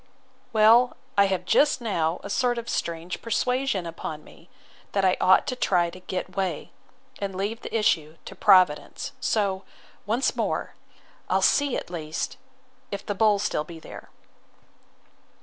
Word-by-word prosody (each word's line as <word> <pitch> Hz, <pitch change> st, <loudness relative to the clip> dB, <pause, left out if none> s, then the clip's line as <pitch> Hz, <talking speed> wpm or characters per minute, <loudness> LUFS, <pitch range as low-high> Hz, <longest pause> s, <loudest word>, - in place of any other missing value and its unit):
Well, 230 Hz, +3 st, +5 dB, 0.2 s
I 200 Hz, -, +5 dB
have 190 Hz, -2 st, -1 dB
just 290 Hz, -2 st, +3 dB
now 170 Hz, -8 st, -1 dB
a -, -, -7 dB
sort 245 Hz, 0 st, +1 dB
of 235 Hz, 0 st, -5 dB
strange 170 Hz, -2 st, -3 dB
persuasion 250 Hz, -3 st, 0 dB
upon 160 Hz, -2 st, -6 dB
me, 170 Hz, -, -18 dB, 0.4 s
that 195 Hz, -1 st, +2 dB
I 185 Hz, -, +4 dB
ought 185 Hz, -, +5 dB
to 255 Hz, -, -2 dB
try 175 Hz, -8 st, +1 dB
to 185 Hz, -, -11 dB
get 185 Hz, 0 st, -5 dB
way, 185 Hz, -5 st, -2 dB, 0.5 s
and 195 Hz, -2 st, -4 dB
leave 205 Hz, +5 st, -3 dB
the -, -, -3 dB
issue 160 Hz, -7 st, +1 dB
to -, -, -8 dB
Providence. 185 Hz, -6 st, +3 dB
So, 205 Hz, -7 st, 0 dB, 0.5 s
once 235 Hz, +6 st, +1 dB
more—I'll -, -, -4 dB
see, 285 Hz, -2 st, +3 dB
at -, -, -7 dB
least, 155 Hz, -3 st, -4 dB, 0.5 s
if 200 Hz, -, -6 dB
this 205 Hz, -, -2 dB
bull 210 Hz, +1 st, +4 dB
be -, -, -4 dB
still 150 Hz, -, 0 dB
there. 160 Hz, 0 st, -11 dB
195 Hz, 150 wpm, -25 LUFS, 175-230 Hz, 0.5 s, Well